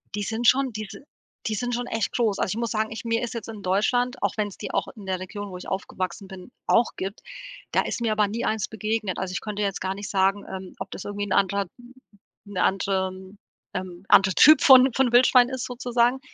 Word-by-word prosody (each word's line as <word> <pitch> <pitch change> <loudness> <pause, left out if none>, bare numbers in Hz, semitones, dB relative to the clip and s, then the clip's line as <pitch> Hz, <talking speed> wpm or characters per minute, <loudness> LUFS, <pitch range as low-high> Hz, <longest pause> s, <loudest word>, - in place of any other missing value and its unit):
Die 205 - -2
sind 225 +3 -1
schon 265 0 +4
die 215 -1 -5
si - - -10 0.5
die 215 - -1
sind 245 +3 -2
schon 245 +1 -2
echt 225 -1 -1
groß. 225 -5 +1
Also, - - 0
ich - - -6
muss 235 -2 -2
sagen, 220 0 -1
ich 225 - -7
mir 230 +1 0
ist 240 - -4
jetzt 230 -3 -6
in 220 -2 -8
Deutschland- 245 +7 +1
auch - - +1
wenn's 205 -2 -2
die - - -6
auch - - -1
in 210 - -11
der 190 -1 -2
Region, 205 +2 -7
wo 180 - -6
ich - - -9
aufgewachsen 190 0 -4
bin, 190 +4 -11 0.2
auch 235 - +3
gibt- 195 +2 -5 0.5
da - - +3
ist - - -4
mir 230 - +1
aber 210 -1 +2
nie 225 +4 -4
eins 220 -2 -1
begegnet. 215 -2 -2
Also, 185 -1 -3
ich - - -2
könnte 210 -1 -4
jetzt 200 -1 -1
gar 190 +1 -2
nicht 205 0 -7
sagen, 195 +1 +1
ähm, 190 -1 -8
ob 190 - -6
das - - -7
irgendwie 205 0 -3
'n - - -9
anderer 200 +1 +2 0.8
'ne 200 -2 -2
anderem 190 0 -1 0.4
ähm, 185 0 -6
anderer 190 -1 +6
Typ 310 -2 +8
von 260 -2 +7
von 265 -3 +2
Wildschwein 245 0 +6
ist, 260 -2 -4
sozusagen, 245 0 +1
210 Hz, 230 wpm, -25 LUFS, 190-235 Hz, 0.8 s, Typ